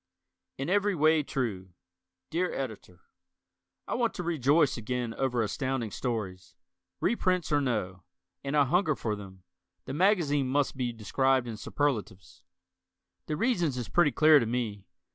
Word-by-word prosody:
In 135 - -3
Every 205 +1 +2
Way, 155 0 +4
True 105 -10 -4 0.6
Dear 175 +3 0
Editor: 110 -9 -6 0.9
I - - -3
want 235 -2 0
to 180 - -4
rejoice 150 -2 +2
again 120 0 -3
over 125 -3 0
Astounding 125 0 -2
Stories. 95 -8 -4 0.4
Reprints 185 -8 0
or 145 -1 +3
no: 105 -9 -2 0.4
and 140 +2 -1
I 145 - +5
hunger 160 +1 +2
for 110 -4 -2
them 95 -3 -11 0.4
the 130 - -5
magazine 155 -6 +2
must 140 +2 0
be 125 -2 -2
described 130 +3 +1
in 115 - -5
superlatives. 105 -6 -3 0.9
The 150 - -2
reasons 175 - +1
is 120 - -4
pretty 175 -4 +3
clear 155 +3 +6
to 115 - -1
me. 110 -4 -3
135 Hz, 145 wpm, -29 LUFS, 110-155 Hz, 0.9 s, clear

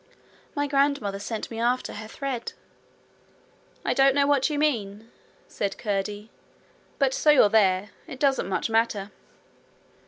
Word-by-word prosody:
'My 290 0 0
grandmother 275 -8 0
sent 220 +3 -5
me 225 - -5
after 245 +2 0
her 215 +1 -8
thread.' 255 0 -5 1.3
'I - - +1
don't 270 0 +4
know 285 0 +4
what 285 -1 +2
you 300 - -2
mean,' 225 -7 -1 0.4
said 200 -1 -3
Curdie; 205 +1 -3 0.7
'but 270 -2 +2
so 305 - +2
you're 275 -8 +6
there, 200 -2 +2 0.2
it 265 - -8
doesn't 270 -9 +1
much 190 - -1
matter.' 225 -3 0
230 Hz, 135 wpm, -25 LUFS, 205-275 Hz, 1.3 s, you're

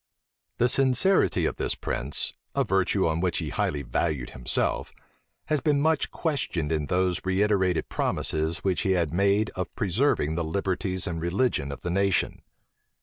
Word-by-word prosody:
The 120 - +3
sincerity 135 +9 +3
of - - -2
this - - 0
prince 70 +4 -2 0.2
(a - - +3
virtue 95 +1 +1
on 80 0 0
which 90 0 0
he - - -2
highly 75 -1 -1
valued 70 -1 -2
himself) 60 -1 -1 0.5
has 150 -3 0
been 145 0 +2
much 155 0 +2
questioned 120 - -2
in 75 -2 -1
those 90 0 +1
reiterated 95 -2 +1
promises 80 +1 -1
which 95 -2 +1
he 95 - +2
had 85 -4 0
made 100 +3 +2
of 90 -2 -4
preserving 100 - +1
the 85 +1 -1
liberties 95 +2 -1
and 85 -2 -3
religion 85 - 0
of 70 - -8
the 85 - -3
nation. 100 +1 +1
95 Hz, 155 wpm, -26 LUFS, 80-105 Hz, 0.5 s, The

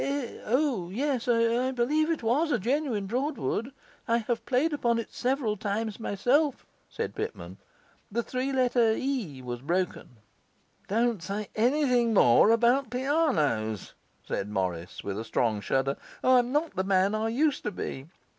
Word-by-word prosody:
'Eh? 275 -3 -3
O! 250 - +1
O - - -10
yes, 255 +4 -1
I 235 +1 +2
believe 280 +5 +1
it 325 -7 -1
was 290 +8 +2
a 245 - +3
genuine 240 -1 -1
Broadwood; 255 +1 -2 0.4
I 230 0 +3
have 235 0 -2
played 280 +5 +2
upon 235 -5 +1
it 230 - -5
several 250 -4 0
times 210 +2 -3
myself,' 255 +8 +1 0.2
said - - -4
Pitman. 440 +2 -6 0.5
'The 235 +3 -1
three 255 +3 -2
letter 245 -4 +3
E 220 - -3
was 120 -1 -5
broken.' 170 -5 -2 0.7
'Don't 230 -1 +1
say 200 +3 -4
anything 245 -1 +2
more 120 - +6
about 235 +3 +3
pianos,' 240 - 0 0.3
said 100 - -3
Morris, 90 -4 -3
with 100 +1 -4
a - - -3
strong 115 -2 0
shudder; 135 +6 0 0.3
'I'm 250 -1 +4
not 300 -3 0
the 190 - 0
man 190 +1 +2
I 215 +1 0
used 285 +5 +1
to 210 - -1
be! 135 -6 -6
235 Hz, 155 wpm, -28 LUFS, 190-265 Hz, 0.7 s, more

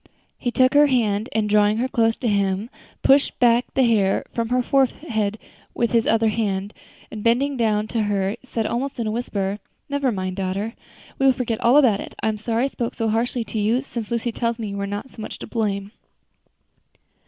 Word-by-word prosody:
He 245 - -1
took 255 +1 +3
her 290 0 +6
hand, 220 -5 +1
and 215 -1 0
drawing 210 0 +3
her 250 +3 0
close 225 -3 +2
to 245 - -3
him, 200 +1 0 0.3
pushed 275 +1 +4
back 240 0 +3
the 265 - +4
hair 210 -5 +2
from 230 -1 -2
her 250 0 +2
forehead 235 -6 0 0.4
with 235 - 0
his 230 -2 +2
other 225 0 +3
hand, 205 -2 -2 0.4
and 215 -1 -6
bending 265 +5 +2
down 215 -3 +1
to 230 - 0
her, 200 -1 0
said 230 -4 -3
almost 260 +5 -2
in 230 - -1
a 215 - -1
whisper, 205 -3 -2 0.3
"Never 280 -2 0
mind, 185 -2 -3
daughter, 195 +4 -2 0.5
we 270 - +4
will 265 - +6
forget 235 -3 -3
all 240 +4 +5
about 240 -9 +5
it. - - -9
I 220 - +2
am 215 - -2
sorry 225 +2 -1
I - - +2
spoke 235 -3 -4
so 225 -1 -1
harshly 235 +2 0
to 220 - -4
you, 220 +4 +2
since 235 -5 -6
Lucy 235 0 -1
tells 230 0 -1
me 220 -3 -4
you 200 - -5
were 200 0 -2
not 205 +6 -5
so 225 - -10
much - - -6
to - - -7
blame." 205 -3 -2
225 Hz, 210 wpm, -22 LUFS, 210-245 Hz, 0.5 s, her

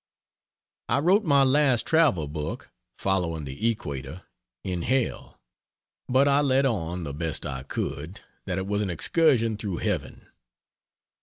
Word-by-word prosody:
I - - +3
wrote 185 +8 +3
my 140 -3 +5
last 135 -3 +3
travel 145 - +3
book 75 0 -5 0.3
[Following 85 -5 -1
the 70 +13 -1
Equator.] 75 - -5 0.4
in 90 -2 -3
hell; 130 +5 -1 0.7
but 130 +3 +4
I 140 +1 +4
let 135 -1 +3
on, 90 -8 -1
the 70 -3 -5
best 80 +1 -3
I 65 -1 -4
could, 70 +7 -5 0.3
that 90 -2 -2
it 95 - -2
was 105 +1 -1
an 100 - -1
excursion 115 - +2
through 100 -4 -4
heaven. - - -3
100 Hz, 140 wpm, -26 LUFS, 80-135 Hz, 0.7 s, my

